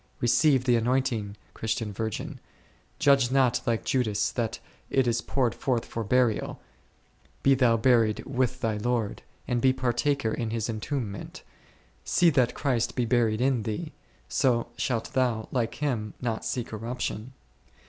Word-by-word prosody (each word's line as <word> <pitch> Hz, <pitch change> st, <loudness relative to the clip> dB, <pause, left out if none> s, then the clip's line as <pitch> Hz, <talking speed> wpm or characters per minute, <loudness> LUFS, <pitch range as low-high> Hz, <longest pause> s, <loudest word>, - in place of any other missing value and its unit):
Receive 125 Hz, +3 st, +4 dB
the 125 Hz, -2 st, +3 dB
anointing, 115 Hz, -4 st, 0 dB, 0.2 s
Christian 110 Hz, -1 st, -2 dB
virgin, 110 Hz, +1 st, -4 dB, 0.6 s
grudge 140 Hz, -3 st, +4 dB
not 130 Hz, -2 st, +3 dB
like 115 Hz, -1 st, 0 dB
Judas 110 Hz, -5 st, +1 dB
that 115 Hz, -2 st, -2 dB, 0.3 s
it 135 Hz, -1 st, +2 dB
is 120 Hz, -1 st, +1 dB
poured 125 Hz, -4 st, 0 dB
forth 125 Hz, -4 st, -1 dB
for 115 Hz, -, -4 dB
burial, 120 Hz, 0 st, +1 dB, 0.8 s
be 135 Hz, -, +6 dB
thou 125 Hz, -3 st, +4 dB
buried 115 Hz, -2 st, +3 dB
with 130 Hz, -1 st, -1 dB
thy 110 Hz, -2 st, 0 dB
Lord, 115 Hz, -1 st, -1 dB, 0.3 s
and 120 Hz, -1 st, 0 dB
be 130 Hz, -, +5 dB
partaker 130 Hz, 0 st, 0 dB
in 115 Hz, -2 st, -2 dB
His 110 Hz, -1 st, -2 dB
entombment, 110 Hz, -1 st, -4 dB, 0.6 s
see 175 Hz, -2 st, +4 dB
that 130 Hz, -4 st, +2 dB
Christ 125 Hz, -5 st, 0 dB
be 125 Hz, -, +1 dB
buried 115 Hz, -2 st, +2 dB
in 130 Hz, -2 st, +2 dB
thee, 110 Hz, +10 st, -4 dB, 0.4 s
so 120 Hz, -4 st, +1 dB
shalt 115 Hz, -3 st, -2 dB
thou, 120 Hz, -4 st, +1 dB
like 120 Hz, -3 st, -1 dB
Him, 120 Hz, -8 st, -2 dB
not 115 Hz, -3 st, -3 dB
see 125 Hz, -, -1 dB
corruption. 115 Hz, +1 st, -5 dB
120 Hz, 145 wpm, -27 LUFS, 110-130 Hz, 0.8 s, be